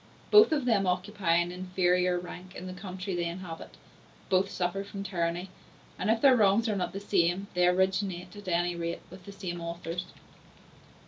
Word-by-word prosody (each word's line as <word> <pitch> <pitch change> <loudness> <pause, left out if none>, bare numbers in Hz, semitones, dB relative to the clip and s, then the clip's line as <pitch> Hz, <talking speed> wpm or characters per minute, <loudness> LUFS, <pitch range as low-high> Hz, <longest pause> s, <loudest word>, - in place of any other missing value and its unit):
Both 420 -2 +8
of 290 -5 +1
them 205 -6 +2
occupy 180 -1 +1
an 175 +1 +2
inferior 180 0 +1
rank 180 +1 -8
in 185 - -7
the 185 - -6
country 185 0 -5
they 175 -1 -1
inhabit; 170 -1 -7 0.5
both 190 0 +3
suffer 180 +1 -2
from 200 0 -7
tyranny; 175 -1 -2 0.5
and 190 - -1
if 225 0 +2
their 270 -2 +7
wrongs 215 0 +4
are 215 - 0
not 185 - -1
the 195 - -4
same, 190 -1 +1
they 180 -1 +3
originate, 185 0 0
at 205 -1 -11
any 175 0 +1
rate, 170 0 -3
with 185 -1 -12
the 200 - -8
same 175 -3 -5
authors. 170 +1 -4
185 Hz, 180 wpm, -29 LUFS, 175-195 Hz, 0.5 s, Both